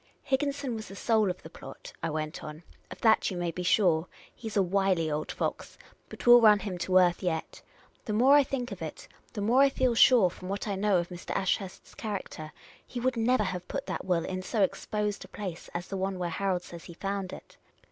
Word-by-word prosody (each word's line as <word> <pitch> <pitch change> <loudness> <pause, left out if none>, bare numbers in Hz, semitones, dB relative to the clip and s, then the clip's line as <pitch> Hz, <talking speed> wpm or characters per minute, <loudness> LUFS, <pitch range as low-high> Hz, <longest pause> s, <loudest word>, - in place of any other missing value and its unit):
" - - -41
Higginson 280 -1 0
was 220 -1 -6
the 195 - -10
soul 220 -1 +2
of 180 - -5
the 160 - -9
plot," - - -11
I 165 - -1
went 155 0 -4
on. 155 +2 -8
" - - -35
Of - - -10
that 220 -1 +4
you 185 - -5
may 175 -1 -1
be 180 - -5
sure. 175 -3 +3 0.3
He 225 - -7
's 215 - -4
a 195 - +5
wily 185 -3 +1
old 150 +1 -2
fox, - - -4 0.3
but - - -10
we 240 - +7
'11 240 -1 +8
run 210 -1 +8
him 190 -3 -4
to 185 +1 +2
earth 175 -2 +4
yet. 160 -3 -3 0.4
The 215 - -2
more 250 +6 +5
I 290 0 +7
think 260 -2 -4
of - - -7
it, - - -7 0.3
the 210 - -4
more 235 +6 +4
I 275 - +6
feel 260 -2 +1
sure, 230 -5 +6
from 185 +1 -9
what 200 +2 -3
I 205 - -1
know 195 0 +2
of 175 0 -2
Mr. 175 -1 -6
Ashurst's 190 0 -2
character, 195 -7 -6 0.4
he 245 - -5
would 255 +1 0
never 230 0 +2
have 180 -2 -4
put - - -4
that - - -4
will 180 -3 0
in 185 0 -4
so 205 +2 0
exposed 210 +2 -2
a - - -12
place 185 -5 -7
as 175 +1 -4
the 195 - -4
one 190 0 -2
where 175 -1 -3
Harold 185 0 -1
says 170 -1 -11
he 170 - -11
found 195 0 -3
it." - - -12
195 Hz, 240 wpm, -29 LUFS, 175-225 Hz, 0.4 s, 11